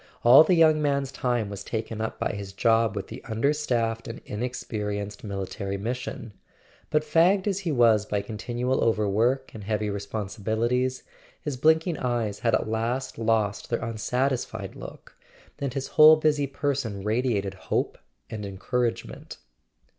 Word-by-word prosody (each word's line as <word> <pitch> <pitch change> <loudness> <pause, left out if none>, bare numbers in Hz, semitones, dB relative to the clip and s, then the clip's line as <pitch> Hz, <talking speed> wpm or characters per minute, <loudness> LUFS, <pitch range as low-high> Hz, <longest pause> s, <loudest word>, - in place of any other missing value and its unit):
All 125 +6 +9
the 180 +3 +3
young 155 -2 +5
man's 140 -2 0
time 120 -5 -1
was 100 0 -7
taken 110 0 -4
up 110 - -3
by - - -1
his 100 -1 -7
job 115 +1 +2
with 100 -2 -3
the 115 - -9
understaffed 115 -2 0
and 115 - -6
inexperienced 105 -3 -4
Military 100 0 -4
Mission; 115 0 -5 0.6
but 155 -1 +2
fagged 170 +6 +3
as 195 -2 0
he 180 -4 -2
was 115 -5 +4
by 100 -1 -1
continual 120 +4 -2
overwork 115 +5 +1
and 110 - -8
heavy 105 0 -1
responsibilities, 110 +5 -2 0.4
his 145 -3 -3
blinking 160 +4 +2
eyes 120 -5 -1
had 115 -2 +2
at - - -1
last 115 +4 -2
lost 110 -3 0
their 115 - -1
unsatisfied 115 -2 -2
look, - - -11 0.4
and 140 -2 -3
his 135 -1 -3
whole 155 +1 +8
busy 150 -2 +1
person 135 -8 -2
radiated 105 -3 0
hope 95 - -2 0.3
and 110 -1 -6
encouragement. 115 +5 -3
115 Hz, 145 wpm, -26 LUFS, 105-135 Hz, 0.6 s, All